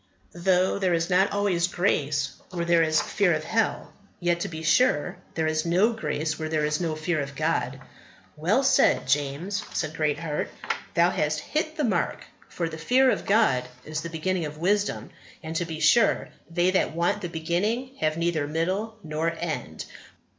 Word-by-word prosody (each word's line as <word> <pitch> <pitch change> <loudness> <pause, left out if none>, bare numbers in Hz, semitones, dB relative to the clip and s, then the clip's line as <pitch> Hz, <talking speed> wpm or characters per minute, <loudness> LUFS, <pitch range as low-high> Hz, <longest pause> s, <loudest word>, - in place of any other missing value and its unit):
"Though 185 +2 +2
there 185 -3 +2
is 170 +2 -1
not 190 +2 +4
always 200 -4 +1
grace 150 -6 0 0.2
where 170 -2 -3
there 170 -1 +4
is 155 -1 +3
fear 190 -5 +2
of 155 - -3
hell; 225 +6 -1 0.3
yet, 175 -1 +1
to - - -2
be 160 -1 -7
sure, 160 -2 +2 0.2
there 160 - 0
is 155 0 0
no 185 +7 +3
grace 160 -8 -2
where 155 0 -3
there 155 -1 +1
is 150 +2 -1
no 165 -3 -1
fear 155 0 -1
of 140 0 -6
God." 155 -4 -1 0.6
"Well 180 - +2
said, 270 - +3
James," 145 +9 0
said 155 -1 -2
Greatheart; 150 0 -1 0.5
"thou 170 +1 +4
hast 155 0 0
hit 310 - -2
the 300 - 0
mark, 195 -9 0 0.3
for 170 - -2
the 160 0 -7
fear 255 +9 +4
of - - -3
God 195 - +3 0.2
is 155 0 -3
the 170 - -5
beginning 165 +1 -1
of 150 0 -7
wisdom; 200 +5 0 0.3
and, 160 +1 -5
to 175 - -1
be 160 -2 -6
sure, 200 +7 +4 0.2
they 175 +2 +2
that 185 -4 +1
want 175 +5 +1
the 175 - -4
beginning 190 +11 -1
have 155 0 0
neither 165 -3 0
middle 190 +8 -2
nor 155 +2 -1
end." 155 - -4
170 Hz, 180 wpm, -26 LUFS, 155-190 Hz, 0.6 s, not